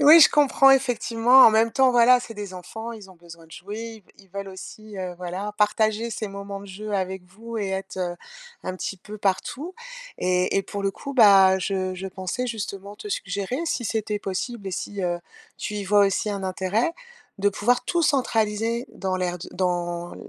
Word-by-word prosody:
oui, 305 +4 +9
je 295 - +8
comprends, 275 -2 +5
effectivement. 245 -1 +4
En - - +8
même 220 +1 +3
temps, 265 -1 +4
voilà, 245 +1 +6
c'est 235 - -8
des 205 -3 -7
enfants, 220 +6 -7
ils 210 -4 -11
ont - - -15
besoin 170 -1 -14
de 160 - -21
jouer. 220 +3 -8
Ils 200 - -18
ils 190 - -28
veulent 200 +1 -6
aussi, 205 +2 -10
heu, 185 -1 -4
voilà, 185 +4 -4
partager 215 +2 +2
ces 220 -1 -4
moments 200 0 -7
de 200 - -11
jeu 210 +2 -7
avec 190 -1 -2
vous 225 +5 -8
et 200 -2 -2
être, 190 0 -4
heu, 175 -1 -2 0.5
un 185 - -4
petit 190 +1 -4
peu 210 +3 -10
partout 250 - -2 0.4
et 180 +1 +1
et 195 - +2
pour 200 +1 -6
le 195 - +1
coup, 280 +7 -8
bah, 195 -6 +7
je 185 -1 -2
je 190 +1 -6
pensais 190 +7 -4
justement 205 -3 -5
te 420 - -8
suggérer 200 - -3
si 245 -6 -1
c'était 215 -1 -1
possible 200 +3 -4
et - - -2
si, 195 +2 -4
heu, 175 -1 -1 0.4
tu 210 - -4
y 205 -1 -3
vois 205 +1 +5
aussi 195 +2 -1
un 200 -1 -4
intérêt 190 - 0 0.4
de 205 0 +2
pouvoir 245 +5 +1
tout 345 - 0
centraliser 230 -5 +1
dans 190 -1 -2
l'aire 180 -1 -2
d 175 - -9
dans 175 -1 -2
205 Hz, 200 wpm, -24 LUFS, 190-230 Hz, 0.5 s, oui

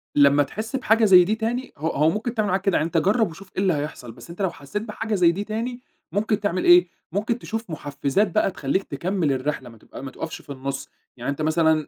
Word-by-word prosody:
لمّا 145 0 +6
تحس 215 - -5
بحاجة 225 -3 +3
زَي 185 -3 +8
دي 210 +5 0
تاني 235 +3 -3
هو 155 +3 -2
هو 155 +1 +3
ممكن 215 +6 -2
تعمل 215 -2 +1
معاك 190 +1 +1
كده، 195 -2 +2
يعني 155 - +1
أنت 165 - -1
جرب 200 +5 +3
وشوف 190 +4 -13
إيه 190 - 0
اللي 190 -3 +3
هيحصَل، 145 -5 -5
بس 115 - -14
أنت 170 +4 -7
لو 190 - +2
حسيت 145 +9 -5
بحاجة 220 0 -3
زَي 175 -3 +5
دي 195 +4 -3
تاني، 230 +4 -4 0.3
ممكن 210 +2 0
تعمل 185 -3 -1
إيه، 175 0 +7 0.2
ممكن 215 +5 -1
تشوف 225 -2 -5
محفزات 145 +6 0
بقى 215 -2 +2
تخلّيك 180 +3 -1
تكمّل 170 +1 -1
الرحلة، 130 -1 -2
ما 115 - -15
تبق - - -15
ما 135 -1 -6
تقفش - - -6
في - - -12
النص. 135 0 -5 0.3
يعني 125 +3 -2
أنت 145 - -5
مثلًا 155 -1 +2
180 Hz, 235 wpm, -24 LUFS, 145-215 Hz, 0.3 s, زَي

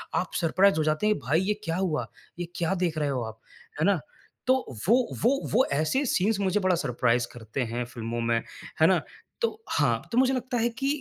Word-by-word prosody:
आप 185 - -1
सरप्राइज़ 185 +3 +4
हो 155 - +2
जाते 155 +7 +1
हैं 215 - +3
भाई 145 +5 +1
ये 200 +2 +1
क्या 165 -3 -2
हुआ? 180 -5 -1 0.3
ये 175 - -3
क्या 170 +2 0
देख 160 -2 -2
रहे 150 -2 0
हो 130 -3 -1
आप, 110 0 -10 0.4
है - - +3
ना? 200 -3 +3 0.5
तो 260 - +6 0.3
वो 230 +5 +6 0.3
वो 270 +4 +4
वो 250 +5 +4
ऐसे 160 - +1
सीन्स 200 +3 +2
मुझे 195 +1 +1
बड़ा 185 -2 +2
सरप्राइज़ 120 -4 +1
करते 115 +2 -5
हैं 120 +1 -1
फ़िल्मों 120 -1 -4
में, 115 0 +2 0.4
है - - +8
ना? - - +3 0.4
तो 465 - +3 0.2
हाँ, - - +2
तो 235 - -1
मुझे 260 +1 +4
लगता 255 -1 -2
है 235 +1 +2
कि 245 +4 -3
175 Hz, 215 wpm, -27 LUFS, 130-215 Hz, 0.5 s, है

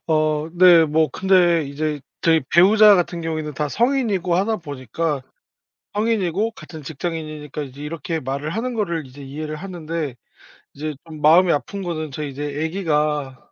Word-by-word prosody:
어 155 -1 +1
네. 175 -2 +7
뭐 155 +1 +2
근데 175 -4 +3
이제 150 +1 -3 0.2
저희 160 -4 +3
배우자 205 +4 +7
같은 175 -2 0
경우에는 155 -2 -3
다 150 -1 -1
성인이고 220 - +1
하다 210 +5 +1
보니까 145 - -3 0.7
성인이고 210 -1 0
같은 160 -7 -11
직장인이니까 155 -1 -5
이제 140 +1 -9
이렇게 160 +1 -4
말을 140 +3 -3
하는 235 +7 -3
거를 170 -9 -2
이제 140 +2 -12
이해를 155 +3 -6
하는데 165 -6 -5 0.6
이제 150 +1 -4
좀 155 -2 -10
마음이 170 +4 +6
아픈 195 +7 -3
거는 155 -4 -4
저희 145 +1 -5
이제 145 +2 -6 0.2
애기가 150 -6 -1
160 Hz, 335 characters per minute, -21 LUFS, 150-180 Hz, 0.7 s, 네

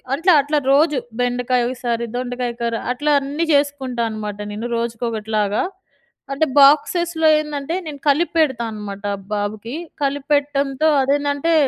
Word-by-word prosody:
అంటే 340 +5 0
అట్లా 295 +2 -1 0.2
రోజు 300 0 +3 0.2
బెండకాయ 245 0 +1
ఒకసారి, 240 -2 -2
దొండకాయ 245 -1 -3
కూర. 235 -1 -1 0.2
అట్లా 295 +4 0
అన్నీ 290 +5 -2
చేసుకుంటా 275 -4 0
అనమాట 210 -1 -5 0.2
నేను, 225 +3 -4
రోజుకొకటిలాగా. 220 -3 -1 0.7
అంటే 315 +3 +2
బాక్సెస్‌లో 320 +3 +4
ఏందంటే 300 +1 -4
నేను 295 -3 -7
కలిపి 315 +5 +2
పెడతా 265 -7 +2
అనమాట 205 -2 -7 0.3
బాబుకి. 210 +4 -3 0.3
కలిపి 280 0 -1
పెట్టడంతో 285 0 +1
అదేందంటే 285 +3 +1
275 Hz, 125 wpm, -20 LUFS, 235-290 Hz, 0.7 s, బాక్సెస్‌లో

